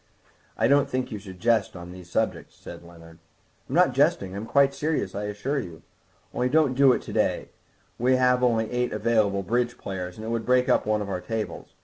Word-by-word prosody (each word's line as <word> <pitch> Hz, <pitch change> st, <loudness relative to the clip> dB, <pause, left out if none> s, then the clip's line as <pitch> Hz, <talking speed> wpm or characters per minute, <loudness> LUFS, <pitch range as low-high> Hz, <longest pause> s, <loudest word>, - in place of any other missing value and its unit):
"I 110 Hz, -, +3 dB
don't 140 Hz, +1 st, +3 dB
think 130 Hz, 0 st, -2 dB
one 105 Hz, -, -5 dB
should 95 Hz, -2 st, -11 dB
jest 115 Hz, -3 st, +1 dB
on 90 Hz, 0 st, -9 dB
these 90 Hz, -1 st, -12 dB
subjects," -, -, -2 dB
said -, -, -11 dB
Leonard. 85 Hz, -1 st, -15 dB, 0.5 s
"I'm -, -, -3 dB
not -, -, +4 dB
jesting, 95 Hz, -1 st, +1 dB
I'm 105 Hz, +3 st, -5 dB
quite 140 Hz, +3 st, +3 dB
serious, 150 Hz, -8 st, -2 dB
I 105 Hz, +1 st, -4 dB
assure 105 Hz, +8 st, -2 dB
you. 85 Hz, -, -8 dB, 0.5 s
Only 125 Hz, +1 st, 0 dB
don't 150 Hz, -2 st, +3 dB
do 135 Hz, 0 st, +5 dB
it -, -, 0 dB
to -, -, -8 dB
day; -, -, 0 dB, 0.5 s
we 130 Hz, +2 st, +3 dB
have 125 Hz, 0 st, +3 dB
only 115 Hz, -3 st, +1 dB
eight 125 Hz, 0 st, -1 dB
available 105 Hz, -2 st, +1 dB
bridge 120 Hz, +4 st, -1 dB
players, 90 Hz, -2 st, -6 dB
and 110 Hz, -, -7 dB
it -, -, -4 dB
would 115 Hz, -1 st, -2 dB
break 125 Hz, +1 st, +2 dB
up -, -, +2 dB
one 105 Hz, -1 st, +1 dB
of 100 Hz, -, -7 dB
our 90 Hz, -2 st, -3 dB
tables. 110 Hz, +1 st, -5 dB
110 Hz, 215 wpm, -25 LUFS, 100-125 Hz, 0.5 s, do